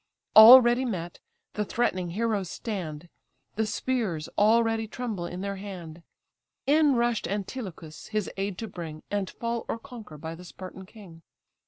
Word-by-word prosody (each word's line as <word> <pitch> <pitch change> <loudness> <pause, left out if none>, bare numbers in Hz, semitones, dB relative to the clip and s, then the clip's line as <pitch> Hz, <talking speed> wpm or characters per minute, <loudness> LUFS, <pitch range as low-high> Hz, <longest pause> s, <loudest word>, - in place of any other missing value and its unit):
Already 240 +2 +10
met, 175 -8 -4 0.3
the 210 - -1
threatening 185 -5 -1
heroes 205 -1 -1
stand; 175 -8 -5 0.5
The 220 +1 0
spears 210 -11 -2
already 225 +1 +3
tremble 215 -7 -4
in 180 +1 -6
their 200 0 -3
hand: 175 -5 -8 0.6
In 290 -1 +4
rush'd 235 -5 0
Antilochus, 190 -5 -6
his 215 -2 -2
aid 195 -1 -3
to 225 - -5
bring, 165 -5 -8
And 200 -2 -1
fall 235 0 -3
or - - -1
conquer 225 -9 -11
by 160 +2 -6
the 170 +2 -11
Spartan 185 +1 -10
king. 185 -7 -14
205 Hz, 145 wpm, -27 LUFS, 175-230 Hz, 0.6 s, Already